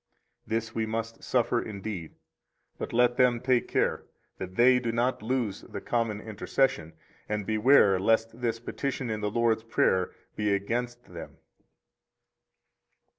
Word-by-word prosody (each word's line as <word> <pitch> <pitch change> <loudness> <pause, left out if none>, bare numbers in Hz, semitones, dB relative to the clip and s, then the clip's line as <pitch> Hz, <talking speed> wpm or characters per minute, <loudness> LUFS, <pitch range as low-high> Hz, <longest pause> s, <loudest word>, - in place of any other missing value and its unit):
This 115 0 -2
we 110 -1 -1
must 115 +1 -4
suffer 120 -1 +1
indeed; 100 -5 -6 0.6
but - - -4
let 120 +1 +3
them 125 -2 +4
take 125 0 +1
care - - 0 0.3
that 95 0 -6
they 125 +3 +6
do 120 -2 -2
not 120 +1 0
lose 115 -3 -1
the - - -7
common 115 -3 -1
intercession, 105 - -1 0.4
and 105 -1 -2
beware 110 -2 +5
lest 115 +3 +1
this 115 -1 -1
petition 130 0 -3
in 105 -1 -3
the 105 - 0
Lord's 115 0 +1
Prayer 95 -5 +2 0.3
be 105 -1 +1
against 120 +4 -3
them. 85 - -9
115 Hz, 135 wpm, -28 LUFS, 105-120 Hz, 0.6 s, they